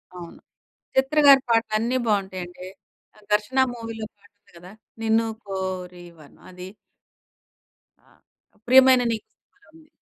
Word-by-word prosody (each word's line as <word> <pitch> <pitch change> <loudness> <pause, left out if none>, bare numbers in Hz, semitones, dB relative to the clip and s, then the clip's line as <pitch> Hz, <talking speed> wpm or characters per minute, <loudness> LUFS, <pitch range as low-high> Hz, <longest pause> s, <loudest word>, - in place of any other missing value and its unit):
అవును. 175 -1 -11 0.6
చిత్ర 265 +3 0
గారి 270 -1 +8
పాటలన్నీ 225 +2 0
బావుంటాయండి. 185 -3 -3 0.6
'ఘర్షణ' 235 +6 +1
మూవీలో 225 -1 -7
పాటుంది 205 0 -28
కదా! 180 +2 -14 0.3
'నిన్ను 225 0 +1 0.2
కోరి 185 -2 -6
వర్ణం' 145 -2 -19
అది. 180 +1 -10 1.4
ఆ! - - -26 0.5
'ప్రియమైన 260 0 +6
నీకు' 220 -2 -5
సినిమాలో 405 - -33
ఉంది. 320 -1 -20
215 Hz, 110 wpm, -23 LUFS, 185-250 Hz, 1.4 s, గారి